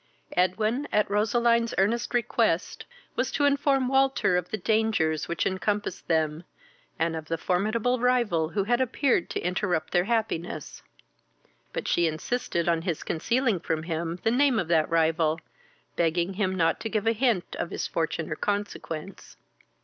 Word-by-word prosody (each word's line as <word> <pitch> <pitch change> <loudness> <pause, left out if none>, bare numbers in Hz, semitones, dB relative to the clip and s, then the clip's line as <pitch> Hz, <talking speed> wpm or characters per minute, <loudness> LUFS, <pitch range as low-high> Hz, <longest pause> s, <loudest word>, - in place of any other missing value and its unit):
Edwin, 215 +10 +1
at 210 - +2
Roseline's 235 +2 +2
earnest 230 +6 +1
request, 230 -7 0 0.3
was - - 0
to 290 - +2
inform 280 -2 +2
Walter 270 -7 +2
of 180 0 -1
the 215 - -2
dangers 210 -7 +1
which 170 - -1
encompassed 205 0 -2
them, 160 -1 0 0.5
and 165 0 0
of 160 -1 -5
the 165 - -1
formidable 215 +9 0
rival 235 -10 +2
who 200 +2 0
had 240 +5 +1
appeared 260 - +1
to - - -2
interrupt 180 -2 -1
their 175 0 +3
happiness; 200 -9 -2 0.9
but - - -4
she 170 -1 +2
insisted 170 +2 -2
on 165 -1 +2
his 170 -3 -3
concealing 230 +4 0
from 160 -1 -2
him 165 0 -3
the 225 - +2
name 265 0 +3
of 180 -6 -1
that 160 -2 +3
rival, 160 -1 +2 0.6
begging 170 +2 +1
him 190 -1 -1
not 165 -3 +2
to 225 0 -4
give 215 -1 -1
a 225 - +4
hint 230 -5 0
of 170 - -2
his - - -3
fortune 160 -1 -2
or - - -1
consequence. 195 -3 -4
190 Hz, 155 wpm, -27 LUFS, 165-230 Hz, 0.9 s, a